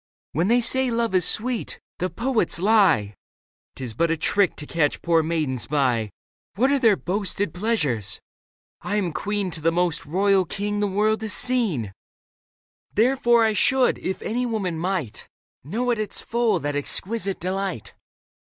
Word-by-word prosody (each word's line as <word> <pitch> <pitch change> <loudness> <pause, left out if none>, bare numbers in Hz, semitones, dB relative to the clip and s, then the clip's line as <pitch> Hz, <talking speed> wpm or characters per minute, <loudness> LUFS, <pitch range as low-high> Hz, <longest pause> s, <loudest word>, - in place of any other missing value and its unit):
When 165 +5 0
they 240 +3 +4
say 260 +2 +3
love 230 -3 0
is 180 -2 +3
sweet, 240 0 0 0.2
the 185 - -1
poets 230 -1 0
lie; 185 - +3 0.6
'Tis 125 -4 -5
but 170 +9 +1
a 165 - 0
trick 195 +4 +2
to 150 - -5
catch 150 -2 0
poor 165 -1 +3
maidens 155 -6 -1
by. 125 -7 +1 0.5
What 260 +7 +2
are 280 - +2
their 225 -5 +5
boasted 195 -1 -2
pleasures? 150 - -1 0.6
I 205 - -3
am 185 -6 -1
queen 205 -2 -2
To 160 - -4
the 165 +2 +2
most 170 -3 -1
royal 190 +3 +2
king 205 +4 -3
the 205 - +1
world 215 +3 +1
has 220 -2 -2
seen; 200 - 0 1.0
Therefore 240 0 +3
I 220 - +2
should, 265 +4 +2
if 190 - -4
any 240 +3 -1
woman 200 -7 -2
might. 165 - -3 0.4
Know 235 - -1
at 235 - -1
its 215 - -3
full 235 -1 +1
that 145 +1 -2
exquisite 195 +7 -3
delight. 185 - -3
195 Hz, 160 wpm, -23 LUFS, 160-225 Hz, 1.0 s, their